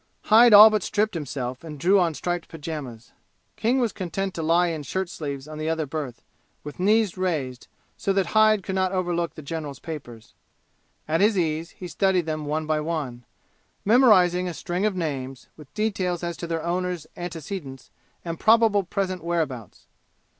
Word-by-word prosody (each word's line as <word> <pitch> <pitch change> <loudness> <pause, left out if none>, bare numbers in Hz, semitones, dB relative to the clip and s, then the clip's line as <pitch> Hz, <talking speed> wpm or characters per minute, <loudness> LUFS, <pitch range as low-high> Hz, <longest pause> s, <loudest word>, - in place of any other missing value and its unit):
Hyde 230 +2 +6
all 210 +1 +10
but 215 -1 +1
stripped 215 +3 0
himself 130 -5 -5
and 155 -2 -8
drew 190 +6 +4
on 170 -3 +1
striped 175 +1 -3
pajamas. 145 -7 -7 0.4
King 240 +4 +1
was 235 -4 +1
content 190 +1 -4
to 165 - -4
lie 170 +2 +3
in 160 -2 -4
shirt 185 +6 -3
sleeves 140 -4 -6
on 155 0 -8
the 155 +1 -2
other 160 -1 -1
berth, 140 -4 -6 0.4
with 150 +2 -9
knees 210 0 +2
raised, 150 -9 -2 0.3
so 195 - -1
that 195 -1 +2
Hyde 215 -2 +4
could 190 - -4
not 185 -1 +1
overlook 175 -4 -1
the 155 - -9
general's 145 -2 -5
papers. 125 -9 -9 0.7
At 160 +3 +1
his 210 0 +3
ease 165 -1 -1
he 180 - -7
studied 185 -1 +1
them 155 -2 -3
one 155 +1 -1
by 155 0 0
one, 150 -7 -4 0.6
memorizing 190 -6 +5
a 175 - -5
string 180 +4 -1
of 205 - -2
names, 135 -7 -4
with 150 -4 -15
details 190 -5 -1
as 170 0 -3
to 170 - -5
their 165 -1 -3
owners' 180 -1 -2
antecedents 165 -5 -7 0.3
and 165 -1 -4
probable 220 -2 +4
present 185 -1 -3
whereabouts. 155 - -3
170 Hz, 175 wpm, -24 LUFS, 155-190 Hz, 0.7 s, all